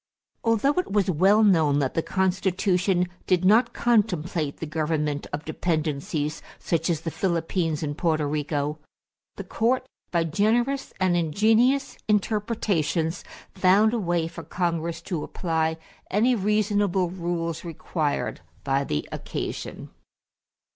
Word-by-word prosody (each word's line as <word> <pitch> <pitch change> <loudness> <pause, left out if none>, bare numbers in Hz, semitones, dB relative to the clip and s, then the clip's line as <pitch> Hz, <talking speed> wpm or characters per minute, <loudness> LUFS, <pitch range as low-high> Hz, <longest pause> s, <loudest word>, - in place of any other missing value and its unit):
Although 230 +5 +3
it 365 - -3
was 195 -2 +2
well 195 +7 +4
known 160 -8 +4
that 135 -3 0
the 165 - +1
Constitution 185 0 +1 0.2
did 185 -1 +2
not 225 +5 +5
contemplate 180 -10 0
the - - -5
government 150 -2 -1
of 145 +1 -4
dependencies, 155 -2 -2 0.2
such 165 0 -1
as 160 -3 0
the 165 - -4
Philippines 165 -3 -1
and 145 -1 -2
Porto 160 -2 +1
Rico, 150 0 -2 0.6
the - - -6
Court, 250 +3 0 0.2
by 170 -2 +1
generous 230 - +1
and 185 -2 +2
ingenious 220 - +2
interpretations, 200 -6 0 0.3
found 195 +4 +4
a 235 - 0
way 175 -4 0
for 165 - -8
Congress 165 0 -2
to 170 -5 -3
apply 160 -2 -1 0.3
any 225 +6 +3
reasonable 205 -4 +1
rules 170 -2 -3
required 160 -3 -2 0.2
by 135 0 +1
the 75 - -2
occasion. - - -5
175 Hz, 125 wpm, -25 LUFS, 160-205 Hz, 0.6 s, not